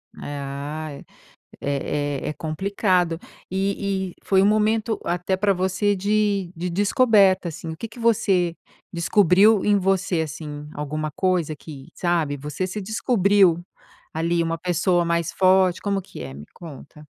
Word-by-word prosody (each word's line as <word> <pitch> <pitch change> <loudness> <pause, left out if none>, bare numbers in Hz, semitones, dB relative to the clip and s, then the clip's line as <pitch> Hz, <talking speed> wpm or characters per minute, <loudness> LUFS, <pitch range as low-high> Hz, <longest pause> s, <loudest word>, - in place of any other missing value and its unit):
É, 145 0 -6
ah, 140 +3 -5
é 140 - -10 0.6
é 145 +1 -2
é - - -1
é - - -2
complicado. 180 +1 0 0.3
E 195 0 -1
e - - -25
foi 190 -1 +3
um - - +4
momento, 215 +2 +1
até 180 +2 -1
para 200 +1 +2
você, 190 +2 0
de 200 -1 0
de 175 +2 -3
descoberta, 200 -1 +3
assim, 165 0 -7
o 160 - -6
que 230 - -5
que 225 - -14
você 190 -7 +2 0.4
descobriu 195 +4 +4
em 205 -1 +4
você, 190 -3 +1
assim? 150 -1 -7
Alguma 155 +1 -3
coisa 180 -3 0
que, 140 -2 -11
sabe, 165 -5 0
você 150 +6 -4
se 190 +3 -5
descobriu 200 -4 +2 0.5
ali 170 +1 0
uma 165 0 -1
pessoa 175 +1 +1
mais 170 -1 0
forte. 185 -1 +3
Como 200 -1 -1
que 185 - -12
é? 65 - -7
Me 75 +2 -10
conta. 150 -2 -12
180 Hz, 155 wpm, -23 LUFS, 155-200 Hz, 0.6 s, um